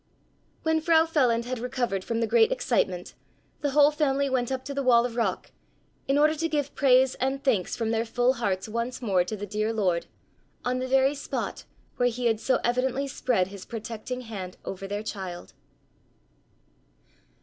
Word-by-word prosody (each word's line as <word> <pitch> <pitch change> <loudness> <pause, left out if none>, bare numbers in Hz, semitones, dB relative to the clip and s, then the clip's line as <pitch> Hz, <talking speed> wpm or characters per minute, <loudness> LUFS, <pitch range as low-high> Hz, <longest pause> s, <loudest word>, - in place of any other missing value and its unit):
When 320 0 +2
Frau 325 0 +4
Feland 250 -8 +2
had 250 0 -3
recovered 245 -6 -2
from 230 +2 -2
the - - +3
great 225 0 +4
excitement 180 -1 0 0.5
the 290 - 0
whole 290 +1 +5
family 280 -2 +1
went 250 -1 0
up 260 0 -3
to 285 - -4
the 280 - -1
wall 240 -3 +5
of 240 -2 -4
rock 220 -6 -1 0.6
in 275 +1 +2
order 305 +1 +5
to 330 +1 -2
give 290 -2 -1
praise 260 -1 +4
and 270 +1 -1
thanks 225 -10 +1
from 225 -1 -1
their 225 0 +1
full 245 +2 +2
hearts 195 -6 -2
once 235 +3 -3
more 195 -7 +2
to 200 +5 -5
the 205 - -5
dear 215 +2 -1
Lord, 185 -6 0 0.6
on 250 +1 0
the 255 - -2
very 270 +1 +3
spot 290 - -4 0.3
where 245 0 +3
he 245 +1 -4
had 225 -2 +2
so 260 +2 +1
evidently 255 +3 0
spread 235 -8 0
his 195 -1 -9
protecting 230 +2 -6
hand 195 -6 -7
over 195 0 -5
their 205 +1 -3
child. 190 -5 -6
245 Hz, 180 wpm, -27 LUFS, 215-270 Hz, 0.6 s, whole